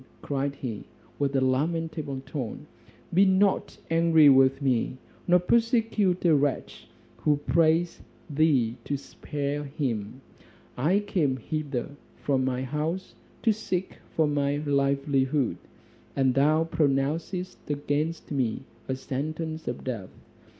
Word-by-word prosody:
cried 140 0 -1
he, 115 -7 -5 0.4
with 140 -1 0
a 135 - +3
lamentable 150 0 -1
tone, 130 -5 -5 0.5
"be 190 +3 +6
not 195 +1 +2
angry 165 -2 +6
with 135 0 +5
me, 130 -2 0 0.3
nor 180 0 +6
persecute 225 -3 +2
a 165 - +6
wretch 145 -1 -1 0.3
who 150 -2 +2
prays 165 +3 +2 0.3
thee 140 -7 +2
to 140 - -2
spare 145 +1 -4
him. 130 -6 -3 0.6
I 170 +11 +2
came 165 -10 0
hither 145 0 -3 0.2
from 135 -2 0
my 130 0 -1
house 155 +7 -3 0.3
to 225 - +4
seek 190 -3 -3 0.2
for 160 - +4
my 145 -1 +1
livelihood, 140 -2 +1 0.6
and 135 -2 +3
thou 150 +4 +4
pronouncest 160 +4 -1
against 150 +3 -2
me 130 -3 -1 0.2
a 130 - -1
sentence 155 +4 -4
of 120 - -4
death. 115 -8 -4
145 Hz, 120 wpm, -27 LUFS, 135-165 Hz, 0.6 s, be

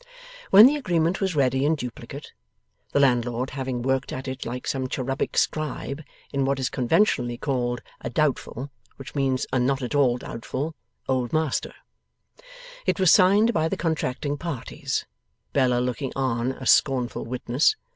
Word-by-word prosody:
When 205 +3 +10
the 290 +4 +5
agreement 175 - 0
was 190 -3 0
ready 135 -1 +2
in 155 +3 +3
duplicate 125 -5 -8 0.6
(the - - +2
landlord 125 -1 +1
having 130 -3 -3
worked 135 +1 0
at 130 +1 -5
it 130 0 -5
like 125 +2 -5
some 130 -1 -2
cherubic 135 +1 -2
scribe, 155 -1 -1 0.3
in 140 -1 +1
what 135 0 +1
is 130 - -1
conventionally 125 - +2
called 120 -3 -2 0.2
a - - -5
doubtful, 140 -1 -1 0.2
which 135 - -10
means 135 -2 0
a 130 - +3
not 135 +2 +1
at 125 - -3
all 130 -4 +3
doubtful, 130 +6 -5 0.3
Old 130 -2 0
Master), 155 -3 0 1.1
it - - +1
was 185 -3 +5
signed 205 +5 +5
by 160 -3 +1
the - - -2
contracting 145 -3 -2
parties, 165 -7 -3 0.5
Bella 125 -3 +3
looking 125 +2 -2
on 130 -2 0
as 130 - +2
scornful 130 -4 +2
witness. 125 - +1
135 Hz, 155 wpm, -25 LUFS, 125-155 Hz, 1.1 s, When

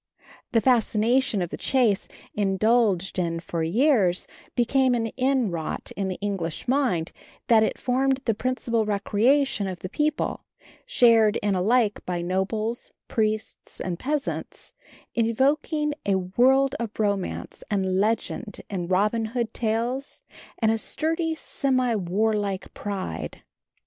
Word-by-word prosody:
The 230 - +3
fascination 235 -2 +2
of 175 - -5
the - - -4
chase, 240 -7 +2 0.3
indulged 200 -1 +2
in 165 -1 -1
for 170 0 -4
years, 195 - +2 0.3
became 255 +1 +3
so 225 -2 -1
inwrought 250 - -1
in 195 -1 -2
the 185 - -3
English 195 -4 -3
mind 245 - +1 0.4
that 225 -2 +6
it 220 - +1
formed 265 +1 +1
the 225 - +2
principal 235 0 -1
recreation 215 +3 +2
of 185 -2 -6
the 185 - -5
people, 300 +6 -1 0.4
shared 230 - +5
in 205 -1 +2
alike 210 +3 +2
by 175 -1 -3
nobles, 215 +6 -2 0.2
priests 215 -1 -2
and 180 -2 -3
peasants, 290 +1 -3 0.4
evoking 285 +6 +1
a 200 - +1
world 255 +9 +3
of 230 -2 -5
romance 200 -3 -2
and 190 -2 0
legend 220 +1 -1
in 180 -3 -3
Robin 210 +5 +1
Hood 230 -2 -1
tales, 235 +4 -2 0.3
and 220 -1 +2
a 225 - 0
sturdy, 325 +5 -1
semi 255 -5 0
warlike 205 0 -1
pride. 200 -2 -5
220 Hz, 125 wpm, -25 LUFS, 195-255 Hz, 0.4 s, that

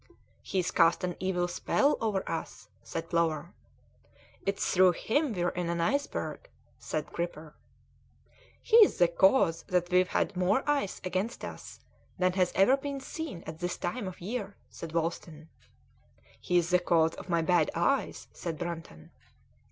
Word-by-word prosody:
"He's 185 -2 -1
cast 165 0 +3
an 180 -1 -2
evil 180 -1 0
spell 280 +10 +1
over 210 -4 -1
us," 135 -10 -5
said 165 +8 -5
Plover. 165 0 0 0.9
"It's 195 0 0
through 185 -1 +6
him 285 - 0
we're 175 -2 0
in 175 -1 -3
an 170 0 -1
iceberg," 285 - -2 0.3
said 155 -1 -4
Gripper. 160 -3 -5 1.1
"He's 455 -3 +6
the 175 - +5
cause 170 -1 +3
that 180 -1 0
we've 180 0 +4
had 200 - -1
more 185 +10 +1
ice 285 -9 0
against 185 +6 -2
us - - -9 0.4
than 185 0 +2
has 185 -1 +2
ever 225 +8 +5
been 280 0 -5
seen 270 - -6
at 160 0 -8
this 175 0 -3
time 205 +4 -3
of 185 - -8
year," 205 +1 -4 0.2
said 165 - -8
Wolsten. 165 -1 -3 0.9
"He's 175 -1 +1
the 180 - +5
cause 165 -2 +2
of - - -10
my 170 -1 +2
bad 170 -2 +3
eyes," 215 +12 0
said 165 -3 -5
Brunton. 165 - -7
180 Hz, 150 wpm, -29 LUFS, 170-195 Hz, 1.1 s, through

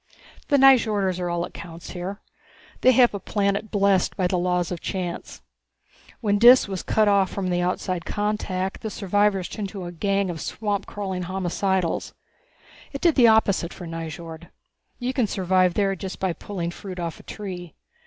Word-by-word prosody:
The 285 - +4
Nyjorders 215 -9 +4
are 175 -1 -2
all 170 0 -1
that - - -7
counts 170 0 -9
here. 190 +3 -6 0.6
They 255 - +6
have 245 -2 +5
a 200 - -3
planet 200 +2 -1
blessed 200 -3 +2
by 185 - +1
the 180 0 +1
laws 180 0 0
of 175 - -4
chance. 180 -3 -5 0.8
When 205 -3 +1
Dis 245 +2 +8
was 190 -2 -4
cut 215 -1 +2
off 200 -2 +3
from 185 -2 -2
outside 180 0 -1
contact, 205 -2 -2
the 220 - -3
survivors 205 -1 +1
turned 210 -3 -5
into 190 -3 -7
a 175 - -6
gang 195 +2 0
of 165 - -7
swampcrawling 200 -3 -3
homicidals. 190 -1 -1 0.8
It 275 - -6
did 340 -2 +4
the 245 -5 +6
opposite 200 -5 +3
for 180 - -8
Nyjord. 165 0 -7 0.5
You 250 +1 -2
can 250 -4 +1
survive 185 -2 +2
there 195 -2 +1
just 190 +1 -7
by 190 -2 0
pulling 175 -2 -5
fruit 185 0 -8
off 170 -2 -4
a - - -14
tree. 180 -5 -7
190 Hz, 170 wpm, -24 LUFS, 180-205 Hz, 0.8 s, Dis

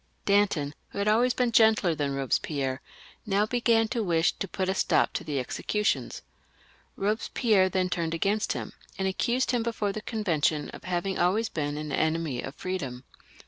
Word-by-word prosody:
Danton, 200 -8 +2 0.2
who - - -10
had 200 +1 0
always 240 +4 +3
been 245 -2 +1
gentler 220 -6 +4
than 145 -3 -2
Eobespierre, 135 0 -1 0.5
now 205 +1 +2
began 230 -1 +2
to 235 - -1
wish 170 -4 +2
to 195 - -4
put 185 +1 -2
a 190 - +1
stop - - +2
to - - -3
the 150 -3 -3
executions. 210 - -1 0.7
Eobespierre 210 -1 +2
then 185 0 +1
turned 170 -2 -1
against 205 +5 0
him, - - -6 0.2
and 190 - 0
accused 240 +7 0
him 245 -2 +1
before 225 -3 -1
the 215 - -5
Convention 165 -10 0
of - - -11
having 185 +1 -2
always 200 +6 +2
been 145 -2 -3
an 150 -1 -5
enemy 160 -5 0
of 140 - -7
freedom. 140 -10 -4
190 Hz, 170 wpm, -27 LUFS, 155-215 Hz, 0.7 s, gentler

